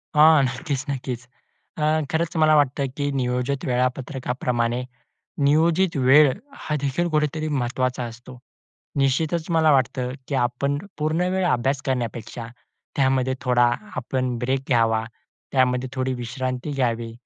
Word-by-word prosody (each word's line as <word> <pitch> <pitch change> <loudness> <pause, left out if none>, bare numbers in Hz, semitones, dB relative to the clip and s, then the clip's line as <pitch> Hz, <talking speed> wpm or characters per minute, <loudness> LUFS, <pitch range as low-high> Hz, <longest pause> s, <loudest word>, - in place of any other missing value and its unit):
हां. 155 -1 +7
नक्कीच, 135 +1 -2
नक्कीच. 130 -3 -3 0.6
अ, 150 - -2 0.3
खरंच 165 +1 -1
मला 155 -1 +5
वाटतं, 140 -1 +2
की 145 -1 -1
नियोजित 130 +1 -1
वेळापत्रकाप्रमाणे 125 -1 -1 0.6
नियोजित 165 +5 +3
वेळ 135 +2 +6 0.3
हा 150 - -1
देखील 145 +5 0
कुठेतरी 155 0 0
महत्त्वाचा 130 -2 -1
असतो. 120 +2 -10 0.6
निश्चितच 155 +5 +1
मला 160 -2 +4
वाटतं, 130 -1 +1 0.2
की 140 - -2
आपण 140 +4 -1 0.2
पूर्ण 160 +4 0
वेळ 190 0 +1
अभ्यास 135 -1 +1
करण्यापेक्षा, 120 -2 -3 0.5
त्यामध्ये 130 -1 +2
थोडा 125 -1 +4 0.3
आपण 130 0 -2
ब्रेक 130 +2 0
घ्यावा, 115 -3 +2 0.5
त्यामध्ये 130 -1 +2
थोडी 130 -1 -1
विश्रांती 130 +3 -4
घ्यावी, 120 -4 -1
130 Hz, 120 wpm, -23 LUFS, 125-150 Hz, 0.6 s, हां